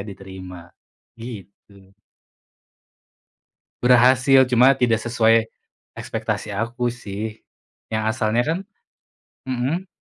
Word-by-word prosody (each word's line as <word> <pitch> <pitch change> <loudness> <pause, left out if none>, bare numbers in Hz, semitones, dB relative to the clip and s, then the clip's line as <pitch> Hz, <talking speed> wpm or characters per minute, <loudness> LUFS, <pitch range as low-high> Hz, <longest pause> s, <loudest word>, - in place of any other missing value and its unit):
diterima, 95 -3 -11 0.5
gitu. 100 -3 -12 1.9
Berhasil 130 +2 +5
cuma 125 +3 +5
tidak 120 -4 +1
sesuai, 115 -1 +2 0.5
ekspektasi 105 - -4
aku 120 +3 -2
sih 110 -1 -7 0.5
yang 110 0 -1
asalnya 115 0 0
kan 165 +3 0 0.9
mhm? 135 +9 -2
115 Hz, 80 wpm, -22 LUFS, 100-125 Hz, 1.9 s, Berhasil